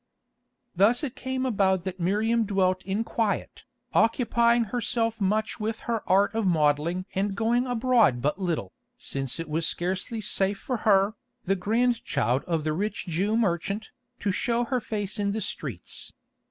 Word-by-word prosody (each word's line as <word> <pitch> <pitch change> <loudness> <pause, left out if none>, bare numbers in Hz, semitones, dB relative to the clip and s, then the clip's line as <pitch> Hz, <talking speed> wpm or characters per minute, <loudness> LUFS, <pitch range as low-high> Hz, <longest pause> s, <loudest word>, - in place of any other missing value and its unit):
Thus 220 - +4
it 270 -3 -3
came 260 0 -3
about 195 -6 +2
that 185 0 -5
Miriam 215 +6 +2
dwelt 185 -3 +1
in 195 +4 -1
quiet, 225 -2 -2 0.3
occupying 235 0 +3
herself 230 0 -1
much 215 +3 0
with 220 +1 -3
her 230 -2 -2
art 195 +4 +4
of 225 -3 0
modelling 160 +2 +2
and 195 +1 -1
going 235 +4 +1
abroad 240 - +3
but 150 +9 -1
little, 160 - -2 0.2
since 135 +2 -2
it 165 - -4
was 160 +2 0
scarcely 190 +6 -2
safe 200 -1 0
for 250 +4 -3
her, 195 +1 +4 0.3
the 195 +1 +1
grandchild 210 - +1
of 165 -3 -1
the 155 0 0
rich 205 +6 -2
Jew 195 +6 0
merchant, 200 0 -1 0.3
to 200 - +1
show 235 +5 0
her 250 0 -1
face 210 -1 -4
in 200 -1 0
the 220 - -1
streets. 120 - -5
205 Hz, 155 wpm, -26 LUFS, 180-230 Hz, 0.3 s, Thus